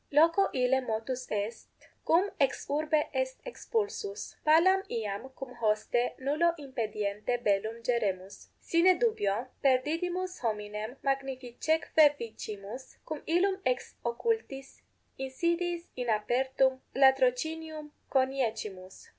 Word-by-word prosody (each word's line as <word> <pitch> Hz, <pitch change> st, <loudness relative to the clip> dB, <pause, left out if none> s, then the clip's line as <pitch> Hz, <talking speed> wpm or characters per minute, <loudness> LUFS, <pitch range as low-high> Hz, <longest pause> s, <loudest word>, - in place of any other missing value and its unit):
Loco 330 Hz, +6 st, +5 dB
ille 260 Hz, 0 st, +2 dB
motus 250 Hz, +2 st, -3 dB
est, 210 Hz, +2 st, -3 dB, 0.4 s
cum 370 Hz, +5 st, +4 dB
ex 275 Hz, -2 st, +1 dB
urbe 305 Hz, +1 st, +2 dB
est -, -, -1 dB
expulsus. 430 Hz, -3 st, -3 dB
Palam 345 Hz, +5 st, +5 dB
iam 215 Hz, +1 st, -3 dB
cum 265 Hz, -2 st, -7 dB
hoste 235 Hz, +1 st, +1 dB
nullo 305 Hz, +6 st, +2 dB
impediente 220 Hz, -5 st, -2 dB
bellum 220 Hz, +3 st, 0 dB
geremus. 200 Hz, -6 st, -1 dB
Sine 350 Hz, +2 st, +4 dB
dubio 240 Hz, -, +1 dB, 0.2 s
perdidimus 340 Hz, +8 st, +1 dB
hominem 215 Hz, +1 st, -3 dB
magnificeque 275 Hz, +3 st, +2 dB
vicimus, 220 Hz, 0 st, -8 dB
cum 310 Hz, -2 st, -5 dB
illum 380 Hz, +3 st, +2 dB
ex 255 Hz, 0 st, -1 dB
occultis 270 Hz, -, -2 dB, 0.4 s
insidiis 340 Hz, +6 st, -1 dB
in 250 Hz, -1 st, -3 dB
apertum 260 Hz, +4 st, +2 dB, 0.2 s
latrocinium 300 Hz, +4 st, +2 dB, 0.2 s
coniecimus. 225 Hz, -8 st, -2 dB
265 Hz, 100 wpm, -30 LUFS, 230-320 Hz, 0.4 s, Loco